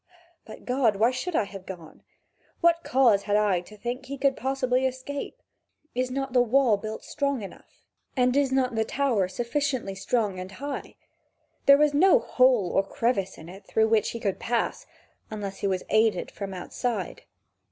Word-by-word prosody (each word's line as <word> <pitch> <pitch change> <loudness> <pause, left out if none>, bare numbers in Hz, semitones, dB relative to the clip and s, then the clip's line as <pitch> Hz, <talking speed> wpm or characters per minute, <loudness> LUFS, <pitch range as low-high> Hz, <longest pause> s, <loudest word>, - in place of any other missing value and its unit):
But, 220 - -12
God, 250 -4 +2
why 225 +5 +3
should 315 +7 -4
I - - +3
have 195 -2 -10
gone? 170 -5 -10 0.6
What 335 0 +3
cause 245 -6 +4
had 205 - +3
I 205 -4 +2
to 210 +4 -15
think 245 +4 -4
that 270 - -16
he 280 +1 -5
could 270 0 +2
possibly 260 -1 0
escape? 260 +2 -6 0.5
Is 255 +1 -1
not 270 0 -3
the 250 - +5
wall 245 -1 +3
built 215 +2 -6
strong 280 -5 -2
enough, 195 - -13 0.3
and 250 0 +3
is 280 -2 +2
not 260 -2 +1
the 220 0 +1
tower 235 -6 0
sufficiently 240 +1 -2
strong 200 -1 -1
and 185 +2 -7
high? 285 +1 -6 0.7
There 280 0 +9
was 300 0 +3
no 375 +10 +6
hole 255 - +3
or - - +3
crevice 195 -1 -1
in 160 - -11
it, 195 +3 -12
through 220 0 +2
which 220 -2 +2
he 235 - -5
could 200 -4 -2
pass, 235 0 -2 0.4
unless 200 -3 -6
he 200 - -1
was 185 -1 -1
aided 215 -4 +2
from 200 -1 -6
outside. 190 +2 -4
240 Hz, 180 wpm, -26 LUFS, 200-265 Hz, 0.7 s, There